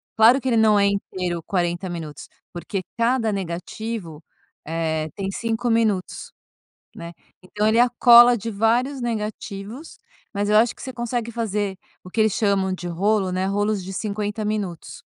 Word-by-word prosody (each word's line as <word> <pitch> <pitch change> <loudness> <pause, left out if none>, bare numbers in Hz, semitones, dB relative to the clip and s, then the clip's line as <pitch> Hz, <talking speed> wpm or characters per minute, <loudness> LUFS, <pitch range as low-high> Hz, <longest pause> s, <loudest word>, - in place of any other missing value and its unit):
Claro 235 +4 +6
que 265 - -4
ele 230 - +2
não 215 -2 +5
é 200 - +4
inteiro, 185 -3 -2
40 175 0 -1
minutos, 160 -4 -7 0.3
porque 175 +3 -4 0.2
cada 230 -1 +1
negativo, 180 -1 -5 0.4
eh, 160 -1 -2
tem 195 -1 -3
5 230 +3 -2
minutos, 220 -5 0 0.7
né. 170 0 -8 0.3
Então 210 +3 -2
ele 220 +2 +3
é - - +7
a 245 - +2
cola 240 0 +8
de 230 +2 -5
vários 235 +6 +1
negativos, 220 +2 -5 0.4
mas 205 +1 -1
eu 210 - +4
acho 225 +1 +4
que - - -13
você 260 - -6
consegue 240 -1 -3
fazer 210 -4 -2 0.3
o 180 - -12
que 220 - -1
eles 215 -2 +3
chamam 200 -3 +1
de 175 -1 -5
rolo, 195 +2 +1
né. 185 +1 -1
Rolos 205 -1 -1
de 190 - -7
50 210 +1 -3
minutos. 205 -6 -4
205 Hz, 165 wpm, -22 LUFS, 185-230 Hz, 0.7 s, cola